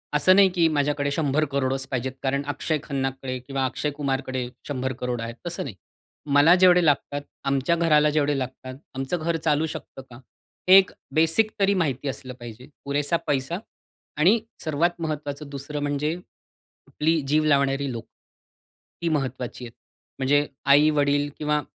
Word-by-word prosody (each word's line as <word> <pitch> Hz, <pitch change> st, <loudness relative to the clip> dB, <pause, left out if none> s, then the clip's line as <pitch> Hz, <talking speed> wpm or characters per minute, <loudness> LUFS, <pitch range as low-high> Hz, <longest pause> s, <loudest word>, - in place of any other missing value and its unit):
असं 185 Hz, +5 st, +5 dB
नाही 195 Hz, -1 st, +6 dB
की 170 Hz, -2 st, +4 dB
माझ्याकडे 145 Hz, 0 st, 0 dB
100,00,00,000 140 Hz, -3 st, 0 dB
पाहिजेत. 130 Hz, 0 st, -2 dB
कारण 140 Hz, +1 st, 0 dB
अक्षय 145 Hz, +2 st, -1 dB
खन्नाकडे 135 Hz, -2 st, -3 dB
किंवा 135 Hz, +1 st, -2 dB
अक्षय 145 Hz, +3 st, -2 dB
कुमारकडे 135 Hz, -3 st, -2 dB, 0.2 s
100,00,00,000 125 Hz, -3 st, -3 dB
आहेत. 115 Hz, 0 st, -5 dB
तसं 170 Hz, -, -3 dB
नाही. 120 Hz, -8 st, -7 dB, 0.6 s
मला 145 Hz, +4 st, +7 dB
जेवढे 180 Hz, -2 st, +6 dB
लागतात, 145 Hz, -1 st, +1 dB, 0.2 s
आमच्या 135 Hz, +4 st, +1 dB
घराला 150 Hz, -3 st, +4 dB
जेवढे 145 Hz, -1 st, +1 dB
लागतात, 130 Hz, 0 st, -6 dB, 0.2 s
आमचं 135 Hz, +6 st, -2 dB
घर 165 Hz, +1 st, -1 dB
चालू 155 Hz, -1 st, +1 dB
शकतं 155 Hz, -3 st, -8 dB
का? 120 Hz, -, -11 dB, 0.5 s
एक 190 Hz, 0 st, +7 dB, 0.2 s
बेसिक 165 Hz, +8 st, +3 dB
तरी 200 Hz, 0 st, +3 dB
माहिती 145 Hz, -7 st, -1 dB
असलं 130 Hz, +1 st, -7 dB
पाहिजे. 120 Hz, +1 st, -10 dB, 0.2 s
पुरेसा 145 Hz, +3 st, 0 dB
पैसा 145 Hz, +6 st, -1 dB, 0.6 s
आणि 195 Hz, +9 st, +5 dB, 0.2 s
सर्वात 170 Hz, +3 st, 0 dB
महत्वाचं 150 Hz, -2 st, -4 dB
दुसरं 145 Hz, +1 st, -5 dB
म्हणजे 145 Hz, +2 st, -1 dB, 0.5 s
कुठली 160 Hz, +1 st, -1 dB
जीव 155 Hz, +2 st, +3 dB
लावणारी 140 Hz, -1 st, +2 dB
लोकं. 115 Hz, -2 st, -7 dB, 1.0 s
ही 170 Hz, -, +1 dB
महत्वाची 130 Hz, -4 st, -3 dB
आहे. 115 Hz, -, -9 dB, 0.5 s
म्हणजे 145 Hz, +2 st, +2 dB, 0.2 s
आई-वडील 145 Hz, 0 st, +4 dB
किंवा 150 Hz, 0 st, 0 dB
145 Hz, 140 wpm, -24 LUFS, 135-155 Hz, 1.0 s, मला